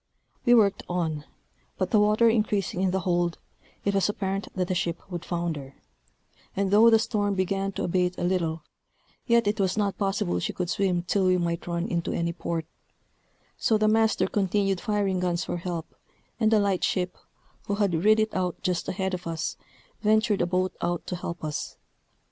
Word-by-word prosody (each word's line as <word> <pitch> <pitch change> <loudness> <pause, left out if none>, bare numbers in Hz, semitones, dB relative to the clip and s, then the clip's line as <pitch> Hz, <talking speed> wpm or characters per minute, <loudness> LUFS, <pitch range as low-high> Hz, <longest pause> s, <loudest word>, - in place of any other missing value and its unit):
We 240 - +7
worked 205 -4 +4
on; 160 -4 -2 0.5
but - - -1
the 215 - +5
water 210 +3 +4
increasing 210 -4 +1
in 190 - +2
the 190 +1 0
hold, 175 -1 0 0.5
it 200 - +2
was 195 +1 +2
apparent 195 -1 -2
that 180 -2 0
the 185 - 0
ship 170 -1 -1
would 175 -1 -4
founder; 165 -7 -3 0.8
and 195 0 0
though 220 +3 +7
the 225 - +6
storm 205 -2 0
began 195 +1 0
to - - -3
abate 180 0 0
a - - -3
little, 170 -3 0 0.6
yet 235 -2 +4
it 205 +1 0
was 190 0 +1
not 200 -2 0
possible 195 - 0
she - - -2
could 180 -1 -2
swim 185 -3 +1
till 190 +1 +1
we 185 0 +4
might 170 -1 -2
run 170 +1 -1
into 170 -2 -1
any 170 0 -1
port; 165 -1 -3 0.9
so 220 - +3
the 215 0 +2
master 220 0 +3
continued 195 -1 0
firing 205 -4 0
guns 175 -2 0
for - - -3
help: 170 -2 -5 0.5
and 220 -1 +3
a 220 - +5
light 200 -3 +1
ship, 180 -1 0 0.5
who 200 - 0
had 200 -3 +1
rid 215 +1 +5
it 215 0 +1
out 180 -2 -1
just 180 -2 -1
ahead 190 0 -2
of 180 -1 -4
us, 165 -1 -3 0.5
ventured 215 -1 +3
a 175 - +2
boat 185 +1 0
out 175 -1 -1
to 180 - -3
help 170 -1 -6
us. 150 -1 -4
185 Hz, 190 wpm, -26 LUFS, 175-205 Hz, 0.9 s, We